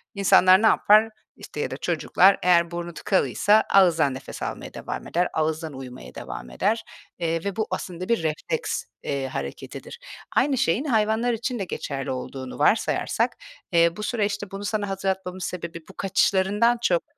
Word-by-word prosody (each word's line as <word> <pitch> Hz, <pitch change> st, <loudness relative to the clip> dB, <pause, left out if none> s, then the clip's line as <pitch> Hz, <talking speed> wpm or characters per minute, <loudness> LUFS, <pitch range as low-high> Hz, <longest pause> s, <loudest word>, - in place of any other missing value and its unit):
insanlar 190 Hz, -1 st, +6 dB
ne 225 Hz, -, +5 dB
yapar, 215 Hz, +1 st, +5 dB, 0.3 s
işte, -, -, -9 dB
ya -, -, -2 dB
da -, -, -4 dB
çocuklar 195 Hz, +2 st, +3 dB
eğer 170 Hz, -1 st, +4 dB
burnu 170 Hz, 0 st, -5 dB
tıkalıysa 205 Hz, +3 st, +2 dB
ağızdan 165 Hz, -7 st, +5 dB
nefes 130 Hz, +1 st, -8 dB
almaya -, -, -6 dB
devam -, -, -6 dB
eder, 175 Hz, +1 st, +1 dB
ağızdan 160 Hz, 0 st, -1 dB
uyumaya 125 Hz, -, -10 dB
devam 60 Hz, 0 st, -7 dB
eder, 215 Hz, -, 0 dB, 0.4 s
eee, 165 Hz, -1 st, -1 dB
ve 200 Hz, -2 st, -2 dB
bu 220 Hz, -, -1 dB
aslında 180 Hz, 0 st, -5 dB
bir 230 Hz, -8 st, +1 dB
refleks, 155 Hz, -1 st, -2 dB, 0.2 s
eee, 140 Hz, -2 st, -2 dB
hareketidir. 305 Hz, -, -7 dB, 0.4 s
Aynı 280 Hz, -2 st, +3 dB
şeyin 230 Hz, -, +1 dB
hayvanlar 225 Hz, -1 st, +1 dB
için 235 Hz, +2 st, -3 dB
de -, -, -1 dB
geçerli 135 Hz, -5 st, -4 dB
olduğunu 130 Hz, +1 st, -6 dB
varsayarsak, 180 Hz, +9 st, +1 dB, 0.4 s
eee, 170 Hz, -1 st, +4 dB
bu 210 Hz, -, -5 dB
süreçte 205 Hz, -3 st, -2 dB
bunu 195 Hz, +1 st, -6 dB
sana 205 Hz, -1 st, -2 dB
hatırlatmamın 190 Hz, -1 st, -3 dB
sebebi 170 Hz, -2 st, -5 dB
bu -, -, -12 dB
kaçışlarından 200 Hz, +4 st, +2 dB
çok 175 Hz, -7 st, +2 dB
185 Hz, 155 wpm, -24 LUFS, 165-210 Hz, 0.4 s, insanlar